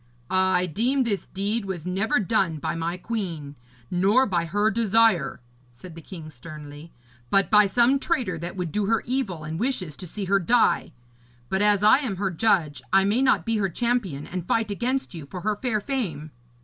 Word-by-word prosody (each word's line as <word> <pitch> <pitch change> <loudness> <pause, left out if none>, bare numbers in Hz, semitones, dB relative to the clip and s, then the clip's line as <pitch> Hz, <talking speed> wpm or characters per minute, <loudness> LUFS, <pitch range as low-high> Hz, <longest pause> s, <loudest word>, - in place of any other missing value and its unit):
'I 185 -1 +3
deem 255 - +1
this 210 -5 -2
deed 205 +3 -2
was 180 -4 -5
never 195 +6 0
done 190 -5 +1
by 150 - -3
my 165 +2 -3
queen, 175 -9 -4 0.4
nor 200 +9 +3
by 175 -7 0
her 205 +5 +1
desire,' 220 - +2 0.3
said 160 +9 -12
the 165 - -10
king 160 -2 -10
sternly, 150 +2 -11 0.4
'but 195 0 +2
by 210 -1 +6
some 245 +7 +3
traitor 185 -12 -1
that 175 +3 -6
would 180 -4 -3
do 205 +3 -1
her 225 0 +1
evil 225 - -2
and 160 +2 -5
wishes 210 - -2
to 180 - -7
see 200 +4 -5
her 200 +1 +3
die. 195 -2 +2 0.6
But 190 - 0
as 205 -1 +3
I 215 +6 +6
am 250 -9 -3
her 190 0 -1
judge, 170 -5 +1
I 195 +1 +5
may 210 +6 +1
not 265 -1 +3
be 230 -1 0
her 195 -2 0
champion 195 - -1
and 180 -1 -6
fight 225 -2 0
against 250 +3 -2
you 160 -5 -8
for 180 +4 -7
her 215 +2 0
fair 240 -5 0
fame. 190 - -4
195 Hz, 190 wpm, -25 LUFS, 170-225 Hz, 0.6 s, by